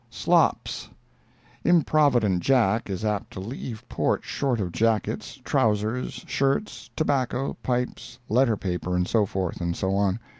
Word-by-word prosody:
"Slops"—Improvident 140 - +1
Jack 115 -5 +2
is 100 +3 -3
apt 105 -2 -1
to - - -6
leave 110 +2 -6
port - - 0
short 130 -4 -1
of 90 -4 -2
jackets, 110 +2 -1
trousers, 110 +3 0
shirts, 140 +10 -1
tobacco, 135 -3 0
pipes, 125 -1 -3
letter 115 -1 +3
paper, 90 -1 -2
and 90 0 +1
so 105 -1 +2
forth 95 -2 -3
and 85 -1 -1
so 95 0 0
on. 100 +1 +1
110 Hz, 125 wpm, -25 LUFS, 95-125 Hz, -, letter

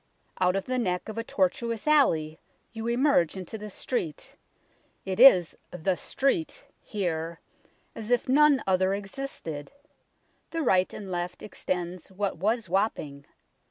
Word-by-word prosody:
Out 180 0 +3
of 195 - -1
the 255 0 -1
neck 180 -3 -1
of 220 +1 -4
a - - -2
tortuous 225 +3 -1
alley 160 - +3 0.3
you 225 0 -5
emerge 240 - +2
into 185 +3 -7
the 210 -1 -7
street 180 - -4 0.7
it 190 +1 -3
is 185 -10 +7
" - - -43
the 190 +1 +2
Street 320 - -1
" - - -44
here, 170 -4 -2 0.5
as 220 0 -8
if 245 -1 +2
none 285 +1 +5
other 190 0 +2
existed 195 - -6 0.8
and 330 -3 -2
right 185 -4 +3
and 195 -3 -8
left 180 0 -4
extends 180 -3 -4
what 200 -1 -2
was 220 +3 0
Wapping. 165 -7 -2
195 Hz, 145 wpm, -27 LUFS, 180-240 Hz, 0.8 s, is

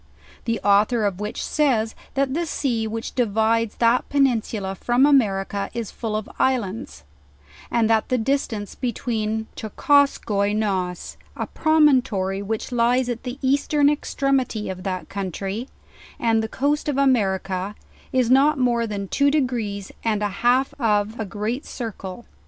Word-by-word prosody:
The 230 -1 0
author 210 +3 +3
of 195 -2 -1
which 210 +1 -4
says, 240 -8 +1 0.2
that 275 -1 +1
the 335 +2 -1
sea 235 -7 -1
which 225 +1 -5
di 250 - +2
vides 225 +1 +1
that 235 +1 +2
peninsula 230 -8 +1
from 240 +7 +2
America 200 -8 +2
is 230 -3 -4
full 220 -3 -4
of 215 -1 -3
islands, 210 - -1 0.7
and 230 -2 +2
that 220 -1 +2
the 255 - +2
distance 225 -4 -1
between 220 -3 -2
Tschukostskoi 215 -4 +2
NOES, 190 -5 -2 0.2
a - - -3
promontory 255 -12 +2
which 220 +4 -4
lies' 245 +1 +2
at 235 -1 -3
the 250 0 -6
eastern 285 +2 +3
extremity 270 -7 -1
of 185 0 -7
that 185 -4 -4
country, 195 - -4 0.5
and 225 -1 +2
the 220 - -2
coast 290 +6 0
of 280 - -1
America, 195 -7 +1 0.4
is 255 -2 +2
not 285 +3 +5
more 240 -2 +1
than 200 -2 -4
two 280 +8 +2
degrees 235 -9 -1
and 215 -2 0
a 205 - +1
half 250 +3 +3
of 215 0 +1
a 220 - -2
great 215 +6 -3
circle. 220 -3 -7
225 Hz, 145 wpm, -23 LUFS, 205-260 Hz, 0.7 s, not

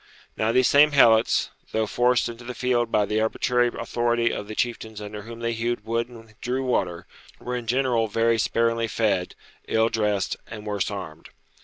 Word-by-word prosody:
Now 110 +1 +1
these 130 +1 +4
same 145 +1 +5
Helots, 115 -5 +4 0.2
though 110 0 +1
forced 120 +3 +2
into 120 0 -8
the 125 +1 -7
field 120 -2 0
by 105 - +3
the 105 +2 0
arbitrary 120 +2 +1
authority 120 0 0
of 105 - -5
the 110 - -7
chieftains 110 -3 -3
under 105 0 -7
whom 115 +2 -10
they 115 0 -1
hewed 115 -1 -2
wood 115 +1 -1
and 115 -2 -14
drew 130 +2 -1
water, 90 -8 -1 0.3
were 125 0 -4
in 120 -2 -5
general 120 -2 +1
very 115 +2 +1
sparingly 115 +1 +1
fed, 100 -5 0 0.3
ill 110 0 +2
dressed, 105 -4 0
and 110 -2 -9
worse 105 -2 -1
armed. 80 -6 -8
115 Hz, 180 wpm, -24 LUFS, 110-120 Hz, 0.3 s, same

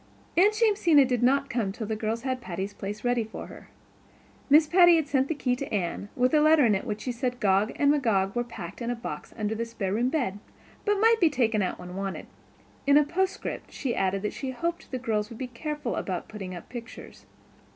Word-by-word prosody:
Aunt 405 +5 +5
Jamesina 350 - +5
did 250 -2 0
not 275 +3 +3
come 235 -5 -1
until 215 +4 -5
the 220 +1 -2
girls 220 +2 -3
had 260 -1 -2
Patty's 190 +2 -5
Place 205 +2 -6
ready 245 -1 +1
for 220 - -8
her. - - -13 0.8
Miss 300 +3 +7
Patty 345 +1 +6
had 320 -3 +1
sent 270 -1 +1
the 320 - -2
key 250 -3 0
to 275 +2 -6
Anne, 200 0 -2
with 250 +2 +2
a 305 - +5
letter 310 -2 +6
in 220 - +4
which 210 +1 -3
she 250 - -2
said 245 0 -3
Gog 200 +2 +2
and 285 0 +3
Magog 210 -9 +1
were 240 - +1
packed 200 -4 -9
in 235 - -2
a 245 - -1
box 190 -11 -7
under 215 -1 -1
the 225 +1 -2
spare 225 -5 -3
room 240 +4 +1
bed, 245 -10 -1 0.5
but 415 -1 +3
might 450 +1 +5
be 335 - +6
taken 230 -6 +1
out 185 - -1
when 180 0 -9
wanted; 195 0 -4 0.6
in 285 +1 +6
a 300 - +6
postscript 375 +6 -3
she 255 -4 -3
added 195 +1 0
that 210 - -2
she 270 - -5
hoped 335 +7 -3
the 260 - -3
girls 220 -4 -1
would 230 - -9
be 260 - -3
careful 275 +1 -4
about 185 -2 -3
putting 190 -4 -7
up 175 - -10
pictures. 235 -1 -10
245 Hz, 225 wpm, -27 LUFS, 210-285 Hz, 0.8 s, Miss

